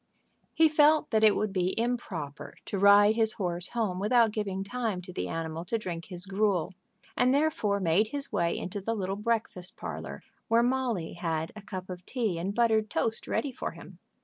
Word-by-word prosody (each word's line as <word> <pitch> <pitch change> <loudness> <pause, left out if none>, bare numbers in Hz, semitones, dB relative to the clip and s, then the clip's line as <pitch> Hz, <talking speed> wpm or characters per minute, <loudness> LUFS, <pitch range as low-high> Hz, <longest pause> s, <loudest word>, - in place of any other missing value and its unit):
He 320 - +6
felt 305 0 +4
that 220 -1 +2
it 215 -1 +6
would 215 -2 -1
be 185 +2 0
improper 195 -12 -4
to 200 - -3
ride 205 +1 +7
his 220 -1 +3
horse 175 -2 -3
home 215 -6 -1
without 225 +2 +3
giving 195 -3 -3
time 220 -2 -2
to 180 - -10
the - - -3
animal 165 0 -4
to 230 - -1
drink 175 -5 -5
his 180 -1 -4
gruel, 195 -3 0 0.4
and 250 +1 +3
therefore 285 -10 +1
made 185 +4 +2
his 280 +4 -2
way 170 0 +1
into 195 +2 -5
the 225 +4 -2
little 195 -2 -2
breakfast 210 -4 -2
parlor, - - -6 0.2
where 230 +1 +4
Molly 245 -9 -1
had 165 -1 -2
a 215 - -8
cup 190 -2 -7
of 180 -1 -8
tea 220 -10 -1
and 195 +4 -3
buttered 220 -2 +2
toast 220 +8 -2
ready 285 - -1
for 240 - -5
him. 170 +1 -13
205 Hz, 190 wpm, -29 LUFS, 180-230 Hz, 0.4 s, ride